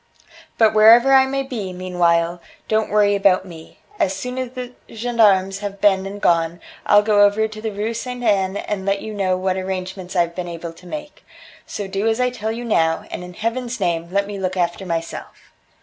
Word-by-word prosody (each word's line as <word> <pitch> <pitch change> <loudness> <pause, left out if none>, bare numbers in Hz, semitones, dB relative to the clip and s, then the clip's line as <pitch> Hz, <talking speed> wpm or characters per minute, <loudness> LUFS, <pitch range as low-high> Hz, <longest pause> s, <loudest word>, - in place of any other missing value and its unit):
But 220 -1 +4
wherever 230 +5 +7
I 265 0 +6
may 275 0 -1
be, 225 -8 -5
meanwhile, 175 -1 0 0.3
don't 220 0 +1
worry 205 -1 +3
about 195 -2 +3
me. 165 -3 -12 0.2
As 190 - +1
soon 250 +6 -5
as 255 -1 -3
the 250 -1 -6 0.2
gendarmes 210 -5 +2
have 200 -1 -6
been 195 -1 +3
and 200 +1 -7
gone, 165 -2 +1 0.3
I'll 205 0 +6
go 210 -1 +3
over 205 +2 +3
to 215 0 -10
the 220 - -2
Rue 210 +3 -3
Ste. 230 +3 -5 0.2
Anne 200 -3 +1
and 205 -1 -4
let 195 +1 -1
you 220 - -6
know 190 -3 0
what 185 0 -1
arrangements 185 0 -5
I've 170 -1 +1
been 180 0 -5
able 170 -1 -7
to 180 +2 -16
make. 300 +7 -8 0.4
So 205 - -5
do 195 +3 -2
as 225 +1 +1
I 250 0 +1
tell 220 -3 -4
you 235 +2 -5
now, 165 -7 +1
and - - -5
in 180 0 -10
Heaven's 235 +2 -3
name 170 -3 -1
let 200 +1 +1
me 200 -1 -6
look 185 0 -2
after 175 +2 -1
myself." 165 -1 -6
200 Hz, 205 wpm, -20 LUFS, 185-220 Hz, 0.4 s, wherever